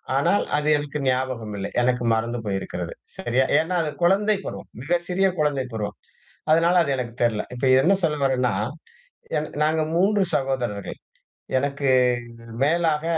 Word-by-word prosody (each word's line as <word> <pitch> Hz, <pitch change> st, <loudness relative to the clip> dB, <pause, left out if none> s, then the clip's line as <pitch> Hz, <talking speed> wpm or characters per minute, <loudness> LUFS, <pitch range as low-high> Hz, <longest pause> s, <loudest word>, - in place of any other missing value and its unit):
ஆனால் 140 Hz, +9 st, +2 dB
அது 150 Hz, 0 st, -1 dB
எனக்கு 145 Hz, 0 st, -4 dB
ஞாபகம் 125 Hz, -4 st, -1 dB
இல்லை. 100 Hz, +1 st, -4 dB
எனக்கு 125 Hz, 0 st, +1 dB
மறந்து 115 Hz, +2 st, -1 dB
போயிருக்கிறது. 95 Hz, -1 st, -3 dB, 0.2 s
சரியா? 125 Hz, +2 st, +1 dB
ஏன்னா 165 Hz, +3 st, -1 dB
அது 150 Hz, -, -2 dB
குழந்தை 205 Hz, +4 st, +3 dB
பருவம். -, -, -7 dB
மிக 170 Hz, +6 st, +1 dB
சிறிய 190 Hz, +2 st, +2 dB
குழந்தை 145 Hz, -3 st, +1 dB
பருவம். 105 Hz, -1 st, -4 dB, 0.5 s
அதனால 170 Hz, +3 st, +4 dB
அது 140 Hz, -, -2 dB
எனக்குத் 120 Hz, -1 st, -5 dB
தெர்ல. 110 Hz, -3 st, +1 dB
இப்போத 130 Hz, +1 st, +2 dB
என்ன 195 Hz, +6 st, +4 dB
சொல்ல 150 Hz, -2 st, +1 dB
வர்றேன்னா, 130 Hz, -3 st, +2 dB, 1.1 s
நாங்க 155 Hz, +1 st, +2 dB
3 200 Hz, +2 st, +3 dB
சகோதரர்கள். 130 Hz, -7 st, -2 dB, 0.6 s
எனக்கு 140 Hz, 0 st, -1 dB, 0.7 s
மேலாக 160 Hz, +1 st, +2 dB
140 Hz, 135 wpm, -23 LUFS, 120-165 Hz, 1.1 s, அதனால